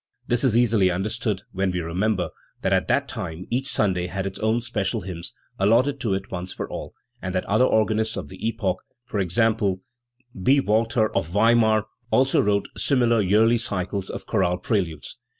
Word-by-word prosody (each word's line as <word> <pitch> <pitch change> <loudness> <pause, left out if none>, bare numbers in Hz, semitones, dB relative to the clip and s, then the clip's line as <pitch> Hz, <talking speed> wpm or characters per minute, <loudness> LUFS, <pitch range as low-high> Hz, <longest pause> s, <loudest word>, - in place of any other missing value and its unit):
This 120 +1 0
is 120 -4 +3
easily 110 -6 +4
understood 100 +2 -2
when 95 0 0
we 90 0 -1
re 85 -1 -5
member 100 0 0 0.3
that - - +2
at - - +2
that - - +1
time 85 0 -6
each 130 +3 0
Sunday 90 -7 +1
had 95 +2 -3
its 95 -1 -5
own 110 +2 +1
special 110 -2 -2
hymns, 85 -2 -6 0.2
allotted 120 +8 +3
to 110 -6 0
it 95 +1 -6
once 90 0 -4
for - - -5
all, - - -7 0.3
and 95 -1 -4
that 90 - 0
other 110 +5 +3
organists 110 -1 +1
of - - -5
the - - -12
epoch 105 -5 -1 0.4
e. 100 -2 +1
g. 115 +6 +3 0.9
B. 135 +8 +4
Walther 110 -1 +1
of 95 -4 +1
Weimar 110 +2 +3 0.2
also 130 +2 +3
wrote 100 0 +1
similar 120 -5 +2
yearly 110 +5 +4
cycles 100 -4 -3
of - - -6
chorale 90 0 +1
preludes. 90 -6 -2
105 Hz, 180 wpm, -24 LUFS, 95-115 Hz, 0.9 s, easily